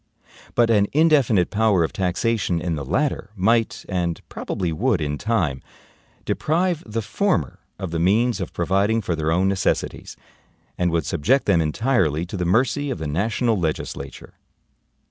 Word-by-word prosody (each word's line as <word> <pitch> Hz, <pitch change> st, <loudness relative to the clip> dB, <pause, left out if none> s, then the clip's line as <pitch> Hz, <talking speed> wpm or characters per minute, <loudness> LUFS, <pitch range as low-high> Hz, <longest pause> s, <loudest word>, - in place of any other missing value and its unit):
But 120 Hz, -1 st, +4 dB
an 100 Hz, -2 st, +4 dB
indefinite 140 Hz, -, +3 dB
power 105 Hz, -5 st, +3 dB
of 80 Hz, -, -2 dB
taxation 95 Hz, 0 st, 0 dB
in 85 Hz, +1 st, -2 dB
the 75 Hz, -3 st, -3 dB
LATTER 130 Hz, -, -1 dB
might, 115 Hz, +4 st, +1 dB
and 90 Hz, -3 st, -1 dB
probably 90 Hz, -4 st, -3 dB
would 110 Hz, +3 st, +1 dB
in 75 Hz, -2 st, -3 dB
time, 90 Hz, -, 0 dB, 0.6 s
deprive 170 Hz, +1 st, 0 dB
the 110 Hz, +1 st, -3 dB
FORMER 100 Hz, -, -1 dB, 0.2 s
of 95 Hz, -3 st, -5 dB
the 85 Hz, -, -2 dB
means 110 Hz, +6 st, +2 dB
of 95 Hz, -, -4 dB
providing 100 Hz, +6 st, +1 dB
for 90 Hz, -3 st, -1 dB
their 80 Hz, 0 st, -1 dB
own 90 Hz, +3 st, +2 dB
necessities; 95 Hz, -2 st, -1 dB, 0.6 s
and 90 Hz, -1 st, +1 dB
would 85 Hz, -3 st, 0 dB
subject 130 Hz, -, +1 dB
them 90 Hz, -5 st, +3 dB
entirely 80 Hz, -, +1 dB
to 90 Hz, -, -7 dB
the 90 Hz, -2 st, -2 dB
mercy 130 Hz, +9 st, +1 dB
of -, -, -2 dB
the 80 Hz, -, -5 dB
national 110 Hz, -, 0 dB
legislature. 75 Hz, -4 st, -4 dB
95 Hz, 155 wpm, -22 LUFS, 85-115 Hz, 0.6 s, But